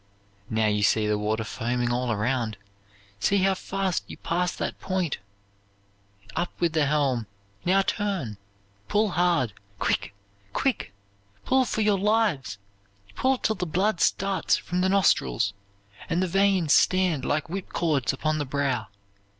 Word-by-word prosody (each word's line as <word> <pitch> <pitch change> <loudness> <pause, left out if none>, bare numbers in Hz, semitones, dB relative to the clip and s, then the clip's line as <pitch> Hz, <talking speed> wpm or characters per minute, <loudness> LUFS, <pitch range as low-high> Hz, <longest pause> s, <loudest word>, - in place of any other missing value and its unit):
"Now 110 0 +1
you 105 -1 +1
see 105 +2 +3
the 105 0 +1
water 110 +2 -1
foaming 120 +2 -1
all 125 0 0
around. 115 0 -1 0.6
See 200 - +2
how 195 0 +4
fast 190 -1 -2
you - - -9
pass 180 +1 0
that - - -4
point! 185 -5 -1 1.2
Up 175 - -1
with 170 -2 +1
the 155 -3 +2
helm! 135 -6 +1 0.4
Now 195 +2 +4
turn! 190 - -2 0.5
Pull 210 - +2
hard! 170 - +1 0.2
Quick, 100 - -1 0.4
quick! 265 - 0 0.5
Pull 260 0 +3
for 220 - -1
your 210 -2 +3
lives! 205 - +1 0.6
Pull 260 0 +2
till 220 - 0
the 180 - -2
blood 190 +4 +1
starts 195 0 +2
from 180 +1 -2
the 185 - +2
nostrils, 125 - +2 0.6
and 170 0 +1
the - - 0
veins 190 -3 +3
stand 180 -7 +3
like 150 +3 0
whip 185 +3 -5
cords 150 -7 +1
upon 155 +3 -1
the 145 - -1
brow! 130 -4 -1
165 Hz, 145 wpm, -26 LUFS, 120-195 Hz, 1.2 s, how